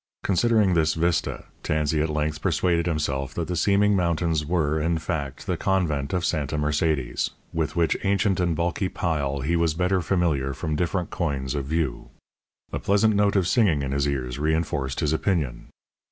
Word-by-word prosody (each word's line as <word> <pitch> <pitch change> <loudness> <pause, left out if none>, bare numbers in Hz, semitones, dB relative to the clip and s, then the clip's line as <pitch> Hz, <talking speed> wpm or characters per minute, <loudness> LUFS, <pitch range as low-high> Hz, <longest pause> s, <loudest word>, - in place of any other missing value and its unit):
Considering 105 0 +3
this 80 -2 +2
vista, 85 +1 0 0.2
Tansey 75 0 0
at 80 - 0
length 75 0 -2
persuaded 85 -1 +1
himself 70 -5 -2
that - - -2
the 90 - -2
seeming 100 +4 +3
mountains 85 -3 +1
were, 80 -1 0
in 80 +1 +1
fact, 75 -5 -4
the - - -1
convent 80 -8 0
of 90 -2 0
Santa 75 0 -1
Mercedes, 75 -3 0 0.2
with 80 -2 -1
which 85 -2 +2
ancient 100 -1 +1
and 85 -2 +1
bulky 85 +3 -1
pile 70 -7 -1
he 80 +6 0
was 85 -2 +1
better 90 +2 +1
familiar 80 -7 0
from 80 +2 -2
different 90 +2 -1
coigns 70 -6 -2
of 70 -2 -2
view. 75 -4 -2 0.6
A - - -1
pleasant 105 +2 +3
note 100 0 +2
of 95 -3 +2
singing 90 - +3
in 70 - -3
his 70 +1 +1
ears 65 -3 -3
reinforced 75 -3 -1
his 75 -1 +1
opinion. 80 -8 -1
80 Hz, 170 wpm, -25 LUFS, 75-90 Hz, 0.6 s, Considering